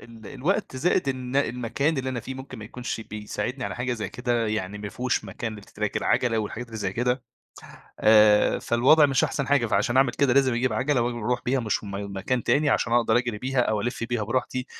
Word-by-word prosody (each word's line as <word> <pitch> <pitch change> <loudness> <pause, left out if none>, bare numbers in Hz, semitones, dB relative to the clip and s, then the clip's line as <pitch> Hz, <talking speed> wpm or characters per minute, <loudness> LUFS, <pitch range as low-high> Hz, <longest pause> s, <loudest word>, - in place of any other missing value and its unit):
ال 115 -3 -13
الوقت، 140 - -2
زائد 170 +1 +1
إن 130 0 -3
المكان 135 +3 0
اللي 130 0 -2
أنا 120 -2 -3
فيه 130 +4 -7
ممكن 130 -3 -9
ما 105 - -8
يكونش 120 +1 -5
بيساعدني 110 +4 -5
على 100 - -4
حاجة 125 0 -1
زي 110 -3 -4
كده، 120 -2 -1
يعني 105 -1 -3
ما 100 0 -5
فيهوش 125 0 -1
مكان 105 +2 -6
لtrack 105 +1 -4
العَجلة، 120 -2 +1
والحاجات 110 +3 -4
اللي 115 -1 -9
زي 95 -2 -2
كده. 125 +2 0 0.8
آآ 105 -1 +5
فالوضع 145 +6 +4
مش 135 -2 +2
أحسن 140 - -2
حاجة، 140 -5 +3
فعشان 115 +5 +1
اعمل 135 -2 +4
كده، 140 -3 +2
لازم 130 -1 +3
اجيب 125 +2 0
عَجلة 135 0 +1
واجي، 120 0 -2
واروح 120 +2 -1
بيها 130 +1 +1
مشم 110 -2 -2 0.3
مكان 125 +5 -1
تاني، 150 +1 +2
عشان 115 - +1
اقدر 120 -1 +3
اجري 120 -3 -2
بيها، 130 +1 0
أو 110 -3 +1
الِف 120 +1 -3
بيها 120 -2 -2
براحتي. 130 +2 -2
120 Hz, 205 wpm, -25 LUFS, 110-130 Hz, 0.8 s, آآ